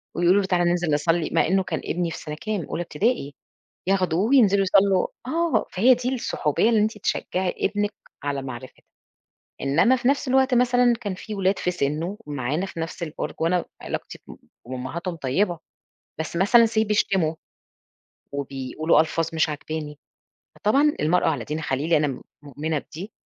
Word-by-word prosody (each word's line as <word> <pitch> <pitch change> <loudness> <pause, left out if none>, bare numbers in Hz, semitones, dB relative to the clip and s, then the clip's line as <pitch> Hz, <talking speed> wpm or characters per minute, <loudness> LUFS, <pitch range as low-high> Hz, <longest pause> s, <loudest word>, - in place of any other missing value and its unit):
ويقولوا 180 +4 +4
له: 190 - -3
"تعالَ 175 -2 +2
ننزل 175 -3 +1
نصلي" 165 +2 +1
مع - - +3
إنه 190 +2 +2
كان - - -3
ابني 170 -1 -1
في - - -6
سنة 150 -1 -6
كام؟ 210 -7 -2
أولى 175 - -4
ابتدائي 160 - -1 0.5
ياخدوه 185 -3 +2
وينزلوا 210 -7 +5
يصلوا 190 0 +3 0.2
آه 335 +5 +1
فهي 240 +8 +5
دي 250 +2 -2
الصحوبية 215 - 0
اللي 220 -2 +3
أنتِ 215 0 0
تشجعي 185 -1 -1
ابنِك 205 +1 0 0.3
على 140 -1 -2
معرفتها، 130 -1 -9 0.8
إنما 160 - +3
في 250 0 0
نفس 280 -1 +1
الوقت 265 0 +3
مثلًا 245 0 +4
كان 205 -5 -3
في 210 +3 -7
ولاد 195 0 +1
في 180 - 0
سنه 170 +4 -2
معانا 145 +5 -2
في 170 -3 -7
نفس 165 +1 -5
البرج 160 -2 -4
وأنا 170 +2 +1 0.2
علاقتي - - -5
مع - - -10 0.4
أمهاتهم 170 +8 -4
طيبة، 165 +5 0 0.6
بس 160 +2 -4
مثلًا 230 +6 +5
Say 220 -1 +1
بيشتموا 195 -6 +1 1.0
وبيقولوا 140 +3 0
ألفاظ 165 +1 0
مش 160 0 +2
عاجباني، 150 0 -5 0.6
فطبعاً 280 +8 +2
المرء 165 +4 +2
على 145 -7 0
دين 155 +4 -4
خليله 150 +3 +1
أنا 150 0 +1
م 135 - -5 0.2
مؤمنة 150 +2 -3
بدي، 185 +9 -9
175 Hz, 165 wpm, -24 LUFS, 155-210 Hz, 1.0 s, وينزلوا